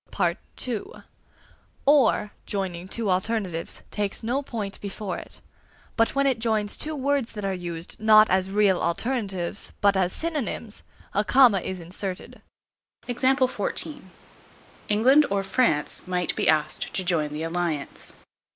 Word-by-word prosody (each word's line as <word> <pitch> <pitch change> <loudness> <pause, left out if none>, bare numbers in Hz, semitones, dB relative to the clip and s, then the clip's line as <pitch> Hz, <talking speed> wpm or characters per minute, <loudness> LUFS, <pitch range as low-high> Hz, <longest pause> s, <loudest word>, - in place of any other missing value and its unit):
(b) - - +2 1.5
"Or," 270 -7 +4 0.2
joining 185 -3 -3
two 215 0 -1
alternatives, 185 -3 -2
takes 205 +1 -3
no 245 +5 0
point 215 -7 -5
before 200 -1 -4
it; - - -12 0.5
but 230 +2 +2
when 275 0 +2
it 260 -4 +2
joins 220 -2 0
two 310 0 -2
words 280 -3 0
that 210 -2 -5
are 195 - 0
used, 175 -2 -6
not 215 0 +7
as 190 0 +1
real 200 -2 +3
alternatives, 195 -1 -2
but 200 -1 +4
as 185 -1 +2
synonyms, 285 - -2 0.3
a 205 - +2
comma 245 -4 +5
is 185 +1 -5
inserted. 180 +2 -4 0.7
England 260 +1 +2 1.7
or 200 0 0
France 195 -7 0
might 180 -2 0
be - - +1
asked 155 -1 +1
to 190 - 0
join 165 -4 +1
the 150 +2 -4
alliance. 165 -4 -3
200 Hz, 130 wpm, -25 LUFS, 180-230 Hz, 1.7 s, not